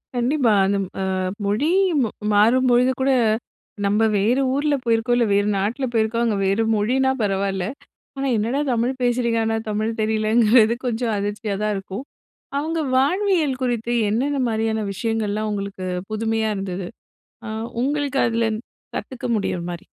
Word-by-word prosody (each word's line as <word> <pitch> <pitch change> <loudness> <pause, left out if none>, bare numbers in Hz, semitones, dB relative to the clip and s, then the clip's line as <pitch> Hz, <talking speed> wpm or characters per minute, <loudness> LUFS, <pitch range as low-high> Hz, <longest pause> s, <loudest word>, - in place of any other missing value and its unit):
கண்டிப்பா. 245 0 +2
அந்த 200 +1 +1
ம் 185 - -7
அ - - 0 0.4
மொழி 215 +10 +1 0.3
ம - - +1 0.3
மாறும்பொழுது 245 +4 +4
கூட, 270 +1 +3 0.7
நம்ம 205 +2 +2 0.2
வேறு 230 +7 +2
ஊர்ல 290 +1 +1
போயிருக்கோம், 230 +1 +2
இல்ல 240 - +3
வேறு 205 +1 +2
நாட்டில 230 +7 -1
போயிருக்கோம். 225 +1 +1
அங்க 215 -3 +1
வேறு 195 +4 +2
மொழினா 260 +6 +2
பரவால்ல. 195 -2 -1 0.5
ஆனா 275 0 -1
என்னடா 240 +7 0
தமிழ் 240 +2 +1
பேசுகிறீங்க, 240 -1 +1
ஆனா 225 0 0
தமிழ் 215 +1 -1
தெரியலைங்கிறது, 220 +1 +4
கொஞ்சம் 235 -1 -1
அதிர்ச்சியா 205 0 -3
தான் 210 0 +1
இருக்கும். 195 +5 -6 0.6
அவங்க 325 +2 -2 0.2
வாழ்வியல் 310 -2 +1
குறித்து, 240 -1 -1 0.2
என்னென்ன 275 +6 0
மாரியான 220 -1 -1
விஷயங்கள்லாம் 215 0 -1
உங்களுக்கு 200 -2 -5 0.2
புதுமையா 220 0 0
இருந்தது, 185 -2 -4 0.6
அ - - -6 0.4
உங்களுக்கு 285 -1 0
அதிலருந்து 230 0 -1 0.3
கத்துக்க 260 -2 -7
முடியுற 180 -3 -2
மாரி? 170 - -8
225 Hz, 140 wpm, -22 LUFS, 210-255 Hz, 0.7 s, மாறும்பொழுது